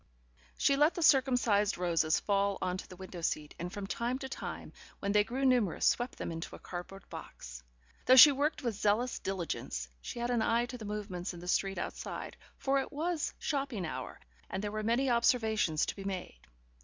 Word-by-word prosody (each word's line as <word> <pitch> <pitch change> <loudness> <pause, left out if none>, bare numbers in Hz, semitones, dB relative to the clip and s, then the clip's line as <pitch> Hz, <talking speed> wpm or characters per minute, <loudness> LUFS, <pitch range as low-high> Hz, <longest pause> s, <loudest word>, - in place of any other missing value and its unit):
She 275 - +3
let 295 +4 +4
the 345 - -1
circumcised 245 -8 +4
roses 165 -3 +2
fall 200 -1 +1
on 180 -1 -1
to - - -8
the 185 - -11
window 185 -1 -8
seat, 150 -2 -2
and 175 +1 -4
from 200 0 -5
time 235 +5 -2
to 265 -1 -6
time, - - -6 0.2
when 200 - -2
they 210 0 +5
grew 260 +5 -2
numerous, 245 -9 +2
swept 245 0 +1
them - - -4
into 165 0 -6
a - - -12
cardboard 180 +2 -8
box. - - -9 0.5
Though 255 - +8
she 290 +3 +11
worked 285 +2 -1
with 235 -2 0
zealous 215 +5 +1
diligence, 170 - -3
she - - -7
had 240 +1 -1
an 240 -2 +2
eye 230 +2 +2
to 250 0 -7
the 220 - -7
movements 200 -3 -4
in - - -9
the 175 - -9
street 195 +1 +1
outside, - - -5 0.2
for 275 0 +1
it 270 - -4
was 320 +2 -1
shopping 270 - -2
hour, 130 -5 -6 0.3
and 190 - -3
there 205 - -2
were 215 0 -3
many 235 +5 +1
observations 220 -9 +2
to - - -4
be 195 - -8
made. 185 - -5
210 Hz, 200 wpm, -32 LUFS, 180-250 Hz, 0.5 s, she